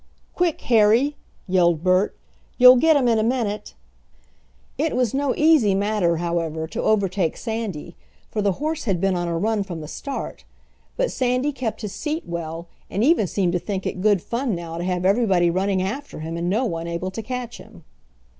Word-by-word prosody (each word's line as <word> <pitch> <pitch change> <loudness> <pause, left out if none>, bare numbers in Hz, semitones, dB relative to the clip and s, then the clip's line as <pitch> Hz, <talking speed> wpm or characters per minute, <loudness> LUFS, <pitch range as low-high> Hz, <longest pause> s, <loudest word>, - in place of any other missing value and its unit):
"Quick, 350 -3 0
Harry!" 235 +5 +3 0.3
yelled 175 -3 +2
Bert. 185 +2 +2 0.4
"You'll 250 0 +9
get 320 +4 +4
him 270 -4 +3
in 230 -2 +3
a - - +1
minute." 225 -3 -2 1.0
It 320 - -1
was 250 -4 +1
no 275 -1 0
easy 300 -11 +4
matter, 200 -4 +1
however, 165 -2 -2
to - - -3
overtake 195 -5 +1
Sandy, 220 -8 -5 0.4
for 215 - -1
the 200 -1 +2
horse 310 - -3
had 195 -6 0
been 195 +1 +1
on 175 0 -2
a 170 -1 -1
run 215 +4 0
from 180 -4 -5
the 155 - -7
start. 275 - -6 0.5
But - - 0
Sandy 255 +3 0
kept 245 -5 -4
his 210 - -4
seat 310 +2 -3
well, 170 0 -5 0.2
and 200 - -1
even 290 - +3
seemed 180 -1 0
to 180 - +1
think 195 0 -4
it 185 - -3
good 205 -3 +3
fun 235 -3 -2
now 170 -1 -6
to - - -3
have 180 -1 -1
everybody 190 -4 +3
running 190 +1 0
after 225 - -5
him 165 +1 -5
and 170 +1 -2
no 225 +7 +1
one 165 -5 -3
able 170 +2 -3
to 225 - -5
catch 245 +1 -5
him. 205 -7 -15
205 Hz, 190 wpm, -22 LUFS, 175-245 Hz, 1.0 s, You'll